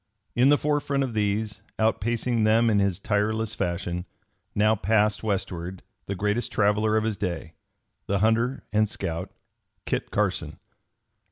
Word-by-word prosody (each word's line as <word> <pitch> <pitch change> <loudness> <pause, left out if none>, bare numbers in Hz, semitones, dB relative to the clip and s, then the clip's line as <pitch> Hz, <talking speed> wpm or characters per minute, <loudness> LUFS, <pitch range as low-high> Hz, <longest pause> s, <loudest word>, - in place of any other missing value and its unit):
In 125 +3 +5
the 145 - +6
forefront 145 -2 0
of 130 -3 -3
these, 105 0 -1 0.2
outpacing 115 +1 +1
them 115 +2 +4
in 105 - +3
his 100 -2 +1
tireless 105 +2 0
fashion, 90 0 -2 0.5
now 105 +1 +4
passed 105 +1 +2
westward 95 -3 -3 0.2
the 100 - -2
greatest 105 +5 0
traveler 105 +1 +2
of 110 - +1
his 110 -1 0
day, 85 -5 -4 0.5
the 100 - +1
hunter 115 +5 +1
and 110 0 +3
scout, 85 +1 -4 0.5
Kit - - -2
Carson. - - -1
105 Hz, 140 wpm, -26 LUFS, 100-110 Hz, 0.5 s, the